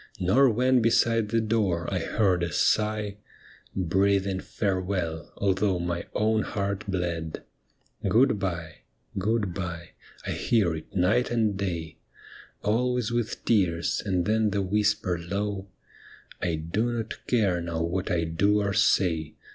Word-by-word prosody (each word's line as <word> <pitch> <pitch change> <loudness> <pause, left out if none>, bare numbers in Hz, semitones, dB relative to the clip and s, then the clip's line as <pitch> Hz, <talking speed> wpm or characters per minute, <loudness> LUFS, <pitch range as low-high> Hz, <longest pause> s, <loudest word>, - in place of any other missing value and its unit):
Nor 125 +10 +4
when 125 +2 +3
beside 115 -1 +3
the 115 +1 +2
door 105 -7 0
I - - +1
heard 95 -5 +1
a 85 -1 -1
sigh 105 +3 +1 0.6
Breathing 95 +1 +1
farewell, 90 -6 -2
although 95 -1 +1
my 85 0 -3
own 110 +1 +2
heart 100 -1 -3
bled. 85 -4 -3 0.3
' - - -7
Good 120 -2 +4
bye,' 85 -4 -4 0.2
' - - -15
Good 105 -1 0
bye,' 85 -3 -5 0.3
I - - -2
hear 105 -8 +1
it 80 +6 -10
night 100 +7 +2
and 110 -4 +1
day, 85 -5 -4 0.6
Always 125 +2 +1
with 120 -2 -2
tears, 90 -7 +1
and 90 -4 0
then 110 0 +2
the 100 0 0
whisper 105 -2 +1
low, 100 +3 -3 0.4
' - - -21
I 85 -2 0
do 95 +10 -1
not 115 -2 -5
care 100 -8 +2
now 85 -1 -2
what 90 +3 -2
I 85 -1 +1
do 100 +6 +2
or 100 -1 0
say. 90 -6 +2
100 Hz, 145 wpm, -27 LUFS, 85-110 Hz, 0.6 s, Nor